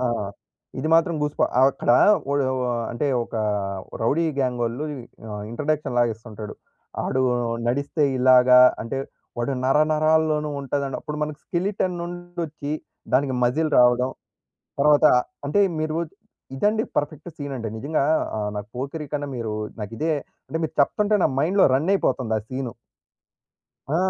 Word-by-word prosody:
ఆ! -, -, -2 dB, 0.8 s
ఇది 155 Hz, -, -1 dB
మాత్రం 165 Hz, 0 st, +3 dB
గూస్‌బ 150 Hz, 0 st, -1 dB, 0.2 s
ఆహ్, 130 Hz, -, +7 dB
అక్కడ -, -, -1 dB, 0.4 s
ఒడ 140 Hz, -, +2 dB, 0.2 s
వ -, -, -1 dB, 0.3 s
అంటే, 130 Hz, +5 st, -1 dB, 0.2 s
ఒక -, -, -12 dB, 0.7 s
రౌడీ 160 Hz, +8 st, +2 dB
గ్యాంగొళ్ళు 125 Hz, +1 st, -1 dB, 0.5 s
ఆహ్, 105 Hz, 0 st, -5 dB
ఇంట్రడక్షన్ 150 Hz, 0 st, -2 dB
లాగా 120 Hz, -1 st, +3 dB
ఇస్తుంటాడు. 110 Hz, -1 st, -9 dB, 0.5 s
ఆడు 130 Hz, -, 0 dB, 0.5 s
నడిస్తే 140 Hz, +4 st, 0 dB, 0.2 s
ఇలాగా 125 Hz, 0 st, +7 dB, 0.2 s
అంటే, 115 Hz, +4 st, -4 dB, 0.4 s
వాడు 125 Hz, +3 st, -1 dB
నరనరాల్లోనూ 155 Hz, +1 st, +2 dB
ఉంటది 140 Hz, +1 st, -2 dB
అన్నప్పుడు, 150 Hz, +3 st, -5 dB
మనకి 150 Hz, 0 st, -3 dB
స్కెలెటన్ 185 Hz, 0 st, -1 dB
నుండొచ్చి 175 Hz, -4 st, -5 dB, 0.4 s
దానికి 135 Hz, -1 st, +2 dB
మజిల్ 155 Hz, +6 st, +1 dB
రావడం. 125 Hz, +1 st, +4 dB, 0.7 s
తర్వాత, 150 Hz, +1 st, +5 dB, 0.4 s
అంటే 180 Hz, +8 st, +2 dB, 0.2 s
మీరు 155 Hz, +1 st, -1 dB, 0.6 s
ఇదండి 215 Hz, +6 st, +2 dB
పర్ఫెక్ట్ 150 Hz, +3 st, -2 dB
సీనంటే, 135 Hz, -6 st, -4 dB
నిజంగా 145 Hz, +4 st, 0 dB, 0.3 s
ఆహ్, 105 Hz, -1 st, -1 dB
నాకు 105 Hz, 0 st, -6 dB
'పోకిరి' 140 Hz, +3 st, -5 dB
కన్నా, 145 Hz, -1 st, -2 dB
మీరు 110 Hz, -2 st, -3 dB, 0.3 s
నాకిదే 115 Hz, +10 st, -2 dB, 0.3 s
అంటే 160 Hz, -, -3 dB
మీరు 160 Hz, -, -3 dB
చెప్తంటే 210 Hz, +8 st, +2 dB
నా -, -, +3 dB
మైండ్‌లో 185 Hz, +7 st, +4 dB
రనైపోతుంది 135 Hz, -, +1 dB
ఆ -, -, -10 dB
సీను. 130 Hz, -2 st, -4 dB, 1.2 s
ఆ! -, -, +4 dB
145 Hz, 130 wpm, -23 LUFS, 125-155 Hz, 1.2 s, ఆహ్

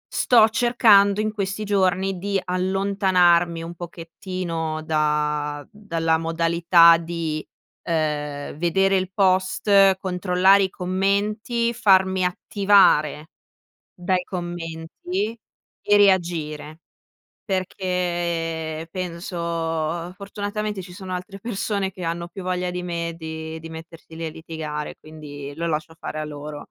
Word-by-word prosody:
Sto 230 Hz, -3 st, +5 dB
cercando 215 Hz, -3 st, +4 dB
in 215 Hz, 0 st, -2 dB
questi 200 Hz, 0 st, -3 dB
giorni 190 Hz, -2 st, +1 dB
di 195 Hz, +1 st, -1 dB
allontanarmi 180 Hz, -2 st, +2 dB
un 170 Hz, +1 st, -7 dB
pochettino 165 Hz, -1 st, -5 dB
da 150 Hz, -1 st, -1 dB
dalla 165 Hz, -6 st, -1 dB
modalità 165 Hz, +1 st, +5 dB
di, 165 Hz, -2 st, -4 dB, 0.5 s
uhm, 150 Hz, -3 st, -2 dB
vedere 195 Hz, +4 st, +2 dB
Il 185 Hz, 0 st, -2 dB
Post, 190 Hz, +1 st, +3 dB
controllare 185 Hz, +1 st, +3 dB
i 190 Hz, -, 0 dB
commenti, 205 Hz, +6 st, 0 dB
farmi 190 Hz, -3 st, +3 dB
attivare 180 Hz, -5 st, +3 dB, 0.7 s
dai 180 Hz, +1 st, 0 dB
commenti 175 Hz, +4 st, -4 dB, 0.4 s
e 205 Hz, 0 st, +4 dB
reagire. 165 Hz, -5 st, +1 dB, 0.7 s
Perché 170 Hz, -4 st, -2 dB
penso, 180 Hz, -1 st, -5 dB, 0.8 s
fortunatamente 205 Hz, 0 st, -4 dB
ci 180 Hz, -, -11 dB
sono 185 Hz, 0 st, -6 dB
altre 180 Hz, +2 st, -7 dB
persone 200 Hz, -3 st, -2 dB
che 180 Hz, -, -10 dB
hanno 170 Hz, 0 st, -3 dB
più 185 Hz, +2 st, -9 dB
voglia 180 Hz, 0 st, -2 dB
di 180 Hz, 0 st, -4 dB
me 170 Hz, -1 st, -3 dB
di 160 Hz, 0 st, -6 dB
di 165 Hz, -, -9 dB
mettersi 160 Hz, 0 st, -11 dB
lì 165 Hz, -, -5 dB
a -, -, -4 dB
litigare, 155 Hz, -2 st, -6 dB
quindi 145 Hz, -2 st, -9 dB
lo 170 Hz, +2 st, -3 dB
lascio 155 Hz, +1 st, -3 dB
fare 155 Hz, -, -6 dB
a 155 Hz, -, -3 dB
loro, 150 Hz, 0 st, -8 dB
180 Hz, 115 wpm, -23 LUFS, 160-195 Hz, 0.8 s, Sto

